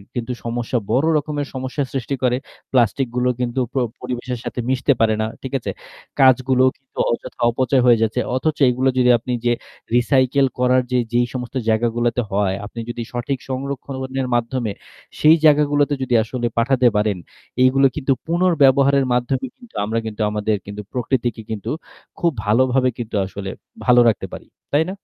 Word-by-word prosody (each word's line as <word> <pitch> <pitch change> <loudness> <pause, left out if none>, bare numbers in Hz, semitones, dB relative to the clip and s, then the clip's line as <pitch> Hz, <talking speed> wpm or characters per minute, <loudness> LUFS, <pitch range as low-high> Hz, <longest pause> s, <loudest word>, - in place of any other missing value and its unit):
কিন্তু 120 +1 -3
সমস্যা 120 +1 -2
বড় 135 +5 +3
রকমের 145 -1 -3
সমস্যা 130 +2 -3
সৃষ্টি 135 +1 -2
করে। 125 0 +2 0.3
প্লাস্টিক 125 +1 +2
গুলো 125 0 +2
কিন্তু 125 +1 -1
প - - -33 0.3
পরিবেশের 125 -1 -4
সাথে - - -5
মিশতে 130 +2 +2
পারে 110 -1 +3
না। - - +1 0.2
ঠিক 135 +1 -7
আছে? - - -4 0.5
কাঁচগুলো 130 -1 +4
কিন্তু 135 - -29
অযথা 120 - -5
অপচয় 130 +2 +1
হয়ে 120 -2 +5
যাচ্ছে। 110 +3 +1 0.2
অথচ 155 +3 0
এগুলো 130 +2 +1
যদি 125 -1 +4
আপনি 125 +2 -4
যে 120 - +3 0.4
recycle 130 +2 +3
করার 125 0 +4
যে 125 - +3
যেই 120 0 +3
সমস্ত 125 0 -6
জায়গাগুলোতে 120 +2 +1
হয় 100 -1 +1
আপনি 115 +2 -9
যদি 120 0 -4
সঠিক 125 +2 -3
সংরক্ষণের 130 0 -4
মাধ্যমে 120 -2 -1 0.5
সেই 155 +2 +7
জায়গাগুলোতে 145 -1 +4
যদি 125 - -2
আসলে 120 +1 -3
পাঠাতে 125 +1 +3
পারেন 105 -2 +1 0.5
এইগুলো 135 +1 +5
কিন্তু 135 -2 +1
পুনর্ব্যবহারের 140 -6 +4
মাধ্যমে 130 +2 0
কিন্তু 245 -2 -18
আমরা 115 +2 -1
কিন্তু 110 0 -5
আমাদের 105 0 0
কিন্তু 100 +1 -7
প্রকৃতিকে 120 -2 -1
কিন্তু 105 -2 -4 0.5
খুব 170 -1 +2
ভালোভাবে 130 +4 +3
কিন্তু 115 -3 -5
আসলে 95 0 -6 0.4
ভালো 125 0 +6
রাখতে 105 - -2
পারি। - - -9 0.3
তাই 155 +2 +3
না? - - -6
125 Hz, 160 wpm, -20 LUFS, 120-135 Hz, 0.5 s, সেই